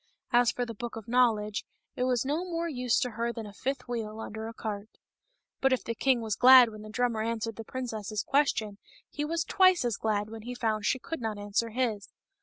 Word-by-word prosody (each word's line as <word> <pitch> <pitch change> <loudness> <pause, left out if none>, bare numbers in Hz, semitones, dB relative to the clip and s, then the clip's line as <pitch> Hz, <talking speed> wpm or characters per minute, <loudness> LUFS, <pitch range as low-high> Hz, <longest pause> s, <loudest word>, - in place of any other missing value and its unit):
As 240 -2 +5
for 245 - -2
the 230 - -6
Book 235 +2 -6
of 225 -2 -8
Knowledge, 225 -4 +2 0.3
it 250 - 0
was 250 -1 +1
no 300 +6 0
more 340 -2 -2
use 250 -6 0
to 250 - -1
her 235 +1 -2
than 230 -2 -6
a 205 - -10
fifth 260 +3 -3
wheel 225 -3 -4
under 220 0 -6
a 225 - -7
cart. 210 -1 -5 0.7
But 270 0 +3
if 255 - -1
the 230 - -3
king 250 +1 +2
was 220 -2 -2
glad 255 -1 +8
when 215 -1 -10
the 215 - -9
drummer 235 0 0
answered 225 0 -2
the 225 - -7
princess's 220 -4 -4
question, 220 -8 +1 0.3
he 295 - -3
was 325 +2 -1
twice 370 -7 +4
as 235 -4 0
glad 210 -1 -1
when 225 -1 -7
he 245 +3 -6
found 220 -3 -1
she 260 - +2
could 260 +4 -6
not 220 -2 -2
answer 205 +3 -1
his. 225 -4 -2
230 Hz, 220 wpm, -29 LUFS, 215-255 Hz, 0.7 s, glad